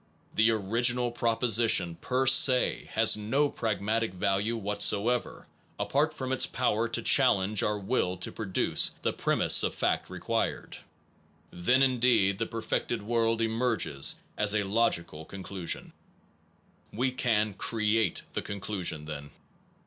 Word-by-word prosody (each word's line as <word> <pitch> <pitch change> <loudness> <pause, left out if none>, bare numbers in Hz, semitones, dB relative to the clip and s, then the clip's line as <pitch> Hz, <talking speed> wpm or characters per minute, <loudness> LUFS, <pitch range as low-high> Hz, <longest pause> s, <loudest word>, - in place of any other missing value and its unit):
The 110 +1 +3
origi 115 +3 +1
nal 125 -1 -2
proposition 115 -6 +1
per 130 +8 -2
se 130 -1 +4
has - - +5
no 130 +8 0
pragmatic 110 -2 -2
value 100 +5 -1
whatso 105 +1 +1
ever, 125 -1 -3 0.3
apart 150 +3 0
from 130 -4 -6
its 130 - +2
power 115 -2 -1
to 115 0 -2
challenge 105 -7 +3
our 105 0 -1
will 95 -3 -2
to 90 - -6
produce 100 -4 +1
the - - 0
premise - - +3
of - - 0
fact - - -1
required. - - -3 0.7
Then 125 +10 +2
indeed 120 -7 +2
the 115 - -2
perfected 115 0 -3
world 115 0 0
emerges 110 - 0 0.2
as 105 0 +2
a 105 - +1
logical 90 -7 -1
conclusion, 95 0 -5 1.0
We 130 +4 -1
can 115 -5 0
create 110 +2 0
the - - -2
conclusion, 95 -6 -3
then. 75 -2 -7
110 Hz, 130 wpm, -28 LUFS, 100-120 Hz, 1.0 s, has